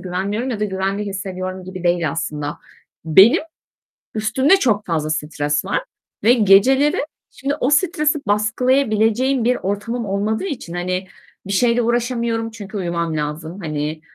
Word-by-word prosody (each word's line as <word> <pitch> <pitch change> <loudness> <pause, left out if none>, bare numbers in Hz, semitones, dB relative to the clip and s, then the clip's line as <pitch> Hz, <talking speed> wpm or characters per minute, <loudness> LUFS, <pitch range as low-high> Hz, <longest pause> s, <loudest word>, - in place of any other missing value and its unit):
güvenmiyorum 200 +7 -2
ya 220 -4 -4
da 210 - +2
güvende 195 +1 -2
hissediyorum 185 -2 -5
gibi 185 -1 -8
değil 175 -3 +2
aslında. 150 -1 -4 0.5
Benim 190 - +6 0.7
üstümde 260 - +3
çok 215 - +1
fazla 155 -3 -1
stres 150 -1 -1
var. - - -1 0.4
Ve 230 +3 +6
geceleri 250 +7 +4 0.3
şimdi 280 +1 -3
o 255 - +1
stresi 305 -1 +2
baskılayabileceğim 225 +3 +2
bir 250 - +3
ortamım 215 +5 -3
olmadığı 210 - -1
için, 255 - -5
hani, 180 +1 -2 0.4
bir 200 - -2
şeyle 240 +3 +3
uğraşamıyorum 235 -1 -1
çünkü 210 -1 -8
uyumam 170 -3 -2
lazım. 155 +4 -4
Hani, 155 -1 -3
205 Hz, 135 wpm, -20 LUFS, 175-240 Hz, 0.7 s, Benim